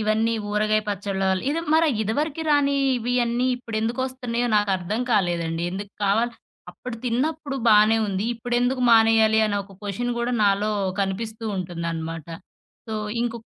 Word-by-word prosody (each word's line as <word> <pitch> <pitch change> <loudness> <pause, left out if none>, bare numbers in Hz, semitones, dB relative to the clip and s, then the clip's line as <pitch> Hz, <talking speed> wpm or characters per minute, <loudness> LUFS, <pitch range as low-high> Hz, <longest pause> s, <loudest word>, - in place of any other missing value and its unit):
ఇవన్నీ 220 +1 +1 0.2
ఊరగాయ 215 +1 +2
పచ్చళ్ళ 200 -1 -3
వల్ల 190 -1 0
ఇది 320 +3 -1
మరి 325 +1 +4 0.2
ఇదివరకి 290 +9 -2
రాని 285 -1 +3 0.2
ఇవియన్నీ 245 +1 0
ఇప్పుడెందుకొస్తున్నాయో 245 +1 -2
నాకర్థం 200 +1 0
కాలేదండి. 170 -5 0
ఎందుకు 200 +2 -6
కావాలి 225 +4 +2 0.4
అప్పుడు 250 -2 -8
తిన్నప్పుడు 275 +4 -1
బానే 215 +1 +6
ఉంది. 195 0 -2
ఇప్పుడెందుకు 245 +2 0
మానేయాలి 225 -1 +5
అనే 205 -1 -1
ఒక 195 0 -16
క్వషన్ 210 +5 -2
గూడా 240 +1 -1
నాలో 200 +1 +2 0.3
కనిపిస్తూ 215 +3 -3
ఉంటుందనమాట. 165 -3 -4 0.6
సో 220 - -4 0.3
ఇంకొ 235 -1 -2
220 Hz, 130 wpm, -24 LUFS, 200-245 Hz, 0.6 s, బానే